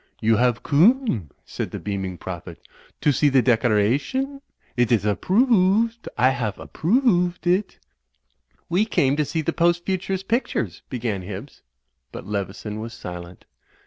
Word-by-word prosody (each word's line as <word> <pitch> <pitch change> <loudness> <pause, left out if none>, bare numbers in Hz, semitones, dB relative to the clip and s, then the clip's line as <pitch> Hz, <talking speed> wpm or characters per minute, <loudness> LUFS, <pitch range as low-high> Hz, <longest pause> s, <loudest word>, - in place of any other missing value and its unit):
'Tfou 110 -1 +3
have 120 -1 +2
coome," 165 - +3 0.2
said - - -4
the - - -6
beaming 95 -3 -4
Prophet, 85 -2 -8 0.4
"to 150 - +4
see 145 +2 +3
the 130 -2 +4
decoration? 130 - +1 0.3
It 120 -1 +2
is 115 -4 +3
approo 185 - +2
ooved. 225 +1 +2
I 125 +2 +4
haf 115 -6 -3
ap - - -11
proo 215 - +2
ooved 180 -8 +1
it." 180 +4 +1 0.9
"We 180 +5 +2
came 140 -10 +1
to 150 - +1
see 160 +2 -2
the 165 - -1
Post 175 0 +2
Futurist 190 0 -2
pictures," 165 - -1
began 115 -6 -3
Hibbs; 100 +8 -8 0.5
but - - -8
Leveson 105 +1 -4
was 115 +1 -7
silent. 90 -4 -9
135 Hz, 150 wpm, -23 LUFS, -, 0.9 s, to